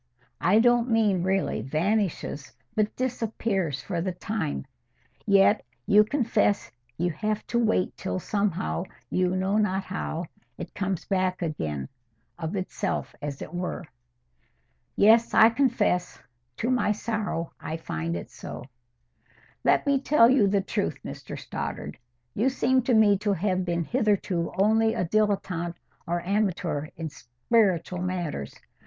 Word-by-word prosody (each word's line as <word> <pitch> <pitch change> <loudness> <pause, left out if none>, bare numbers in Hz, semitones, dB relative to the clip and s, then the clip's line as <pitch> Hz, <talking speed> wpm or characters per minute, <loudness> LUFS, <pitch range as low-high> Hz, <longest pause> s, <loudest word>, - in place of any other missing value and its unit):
"I 180 +7 +4
don't 240 +1 +4
mean 215 -5 +3
really 190 - 0
vanishes, 155 - -1 0.2
but 215 0 0
disappears 220 - -1
for 175 -4 -2
the 185 +2 -1
time. 180 -6 -3 0.6
Yet 200 +1 +5 0.2
you 205 - +5
will 210 - +1
confess 215 - +1 0.3
you 175 +1 0
have 215 +7 -2
to 235 - 0
wait 220 -5 +1
till, 190 - -3
somehow, 185 - -1 0.3
you 185 0 +1
know 190 +2 +1
not 195 -2 +1
how, 180 -3 -4 0.3
it - - -7
comes 195 -3 -2
back 185 -2 0
again—of 125 - -6
itself, 190 +1 -3
as 145 -2 -4
it - - -10
were." 175 0 -3 1.1
"Yes, 225 +3 +5
I 225 - +8
confess. 235 -8 +1 0.4
To 240 - 0
my 235 -4 +2
sorrow, 210 -6 -3
I 160 - -4
find 85 - -3
it 85 - -8
so." - - -8 1.0
"Let - - +3
me 280 -2 +2
tell 260 -5 +5
you 245 -7 +4
the 200 0 +2
truth, - - -2
Mr - - -7
Stoddart. 75 - -5 0.4
You 235 +6 +2
seem 260 0 +2
to 245 - +3
me 205 -3 +5
to 205 0 +1
have 185 0 0
been 170 -1 -1
hitherto 200 - 0
only 220 +3 +3
a - - 0
dilettante 180 -4 0 0.3
or 175 +1 0
amateur 185 -6 0
in 165 -1 -4
spiritual 175 - 0
matters. 175 - -3
190 Hz, 135 wpm, -26 LUFS, 170-215 Hz, 1.1 s, I